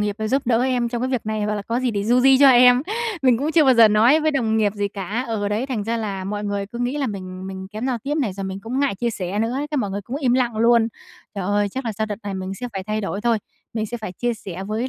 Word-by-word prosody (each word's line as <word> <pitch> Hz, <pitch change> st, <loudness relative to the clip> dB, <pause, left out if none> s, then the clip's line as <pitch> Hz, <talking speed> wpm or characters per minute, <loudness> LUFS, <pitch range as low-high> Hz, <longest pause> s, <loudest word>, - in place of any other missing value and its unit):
nghiệp 210 Hz, -1 st, -1 dB
rồi 220 Hz, 0 st, -2 dB
giúp 270 Hz, +4 st, +1 dB
đỡ 235 Hz, 0 st, +3 dB
em 250 Hz, -2 st, +1 dB
trong 235 Hz, 0 st, -3 dB
cái 255 Hz, -, 0 dB
việc 250 Hz, -4 st, -2 dB
này 215 Hz, -1 st, -2 dB
hoặc 210 Hz, 0 st, -1 dB
là 205 Hz, -, -4 dB
có 230 Hz, +4 st, -2 dB
gì 255 Hz, -1 st, 0 dB
thì 200 Hz, -2 st, -2 dB
du 240 Hz, +3 st, +3 dB
di 265 Hz, +1 st, +6 dB
cho 280 Hz, 0 st, +8 dB
em." 250 Hz, 0 st, +6 dB, 0.4 s
Mình 250 Hz, -3 st, +4 dB
cũng 295 Hz, +4 st, -1 dB
chưa 320 Hz, -2 st, +5 dB
bao 260 Hz, -2 st, +5 dB
giờ 230 Hz, -2 st, +7 dB
nói 230 Hz, +9 st, +5 dB
với 310 Hz, 0 st, +2 dB
đồng 230 Hz, -6 st, 0 dB
nghiệp 210 Hz, -2 st, +2 dB
gì 205 Hz, -1 st, -1 dB
cả, 205 Hz, +5 st, -4 dB
ờ, 210 Hz, -3 st, -1 dB
đấy, 215 Hz, +5 st, -1 dB
thành 240 Hz, -7 st, -3 dB
ra 230 Hz, +2 st, -1 dB
là 200 Hz, -4 st, -4 dB
mọi 205 Hz, +2 st, -4 dB
người 200 Hz, -1 st, -2 dB
cứ 235 Hz, +4 st, -9 dB
nghĩ 245 Hz, +3 st, -1 dB
là 280 Hz, -, 0 dB
mình 185 Hz, -3 st, -6 dB
mình 190 Hz, 0 st, -7 dB
kém 215 Hz, +4 st, -4 dB
giao 255 Hz, -3 st, -1 dB
tiếp 280 Hz, +6 st, -3 dB
này 255 Hz, -10 st, 0 dB
rồi 195 Hz, +1 st, -6 dB
mình 190 Hz, 0 st, -5 dB
cũng 240 Hz, +6 st, -3 dB
ngại 280 Hz, -6 st, +1 dB
chia 235 Hz, +4 st, -1 dB
sẻ 195 Hz, -2 st, -4 dB
nữa, 225 Hz, +3 st, 0 dB
cái 300 Hz, -, -2 dB
mọi 205 Hz, -6 st, -1 dB
người 200 Hz, +1 st, -3 dB
cũng 250 Hz, -, -5 dB
im 265 Hz, -5 st, +1 dB
lặng 245 Hz, -3 st, 0 dB
luôn. 230 Hz, 0 st, +4 dB, 0.5 s
Trời 195 Hz, -2 st, -3 dB
ơi, 205 Hz, +1 st, +1 dB
chắc 260 Hz, +6 st, -5 dB
là 225 Hz, -, -2 dB
sau 220 Hz, +1 st, -2 dB
đợt 210 Hz, -1 st, -4 dB
này 200 Hz, -1 st, -4 dB
mình 190 Hz, 0 st, -4 dB
sẽ 245 Hz, +5 st, -5 dB
phải 195 Hz, -2 st, -4 dB
thay 215 Hz, +2 st, -2 dB
đổi 200 Hz, 0 st, -3 dB
thôi, 230 Hz, 0 st, +2 dB, 0.4 s
mình 220 Hz, -1 st, -1 dB
sẽ 240 Hz, -, -5 dB
phải 215 Hz, -5 st, -6 dB
chia 240 Hz, +6 st, -2 dB
sẻ 190 Hz, -4 st, -7 dB
với 220 Hz, +5 st, -2 dB
220 Hz, 315 wpm, -22 LUFS, 205-250 Hz, 0.5 s, cho